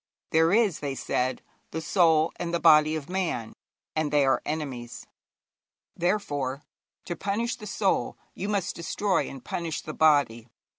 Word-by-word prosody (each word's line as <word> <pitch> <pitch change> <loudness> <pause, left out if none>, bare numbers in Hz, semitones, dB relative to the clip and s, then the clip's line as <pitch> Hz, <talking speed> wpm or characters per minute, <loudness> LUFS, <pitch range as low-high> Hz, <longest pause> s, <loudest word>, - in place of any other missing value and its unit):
'There 160 +1 +4
is,' 210 -5 +3
they 140 -2 -3
said, 130 -1 -1 0.3
'the 160 - -4
soul 160 -2 +3
and 170 - -3
the 170 - 0
body 155 0 +6
of 155 -2 -5
man, 175 -11 -2 0.4
and 155 -1 0
they 145 -2 +4
are 135 - +2
enemies; 135 -6 -5 0.9
therefore, 145 -7 -1 0.4
to 175 - -4
punish 215 +6 -1
the 210 -3 -10
soul, 200 -1 0 0.2
you 200 - -4
must 200 -3 -1
destroy 185 +3 0
and 135 -2 -10
punish 165 -3 -3
the 155 - -7
body. 145 -8 +3
160 Hz, 150 wpm, -27 LUFS, 145-185 Hz, 0.9 s, body